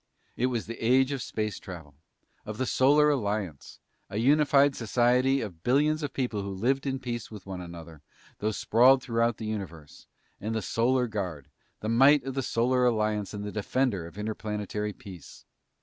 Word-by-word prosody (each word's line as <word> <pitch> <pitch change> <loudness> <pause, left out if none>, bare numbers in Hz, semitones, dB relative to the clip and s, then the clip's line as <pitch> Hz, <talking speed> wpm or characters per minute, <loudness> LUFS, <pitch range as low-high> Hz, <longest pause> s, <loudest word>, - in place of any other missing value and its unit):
It 125 - +1
was 120 -3 -2
the 115 0 -7
age 130 +3 +4
of 135 -3 -3
space 110 -2 -3
travel; 85 -7 -10 0.5
of 105 0 -7
the 130 - -1
Solar 145 +4 +4
Alliance, 105 - -3 0.3
a 100 - -5
unified 140 +2 +4
society 125 +4 +2
of 90 -8 -7
billions 150 - +2
of 145 -3 -3
people 125 -6 -2
who 100 - -5
lived 130 +9 0
in 135 0 -1
peace 120 -3 -5
with 105 -3 -10
one 95 -2 -6
another, 85 -3 -10 0.4
though 105 - 0
sprawled 125 +5 +4
throughout 115 -1 0
the 110 - -6
universe; 90 -8 -7 0.3
and 110 +2 -3
the 110 - -1
Solar 125 +2 +1
Guard, 95 - -5 0.3
the 110 - -3
might 135 +4 +5
of 135 0 -4
the 135 - -1
Solar 125 +1 +1
Alliance 110 -4 +1
and 105 -1 -6
the 105 - -5
defender 105 -4 -1
of 85 - -14
interplanetary 105 -1 -3
peace. 95 - -12
115 Hz, 175 wpm, -28 LUFS, 105-130 Hz, 0.5 s, might